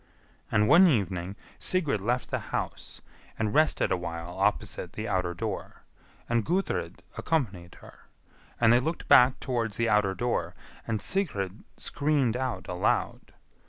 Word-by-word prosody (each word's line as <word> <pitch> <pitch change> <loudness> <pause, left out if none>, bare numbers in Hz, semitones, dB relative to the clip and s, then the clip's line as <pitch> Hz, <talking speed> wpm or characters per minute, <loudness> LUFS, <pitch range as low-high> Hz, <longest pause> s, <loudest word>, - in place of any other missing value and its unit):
[And 105 0 +3
one 180 +8 +7
evening 95 - 0 0.2
Sigrid 150 - 0
left 120 +5 -1
the - - 0
house, - - -4 0.4
and 110 -2 -1
rested 155 +1 +3
awhile 85 -1 -3
opposite 90 - -1
the 110 +1 -5
outer 90 -3 -1
door; - - -5 0.4
and 115 -1 +1
Gudrid 185 - -2 0.2
accompanied 100 - -2
her; - - -16 0.5
and 115 -1 +5
they 120 - +6
looked 160 +6 -3
back 125 +1 +6
towards 115 -4 -2
the 115 -1 +1
outer 105 -3 +2
door, 120 +5 -2 0.3
and 110 -3 -1
Sigrid 105 - -2
screamed 140 -5 0
out 125 -8 -3
aloud. 90 0 -1
115 Hz, 135 wpm, -28 LUFS, 95-130 Hz, 0.5 s, one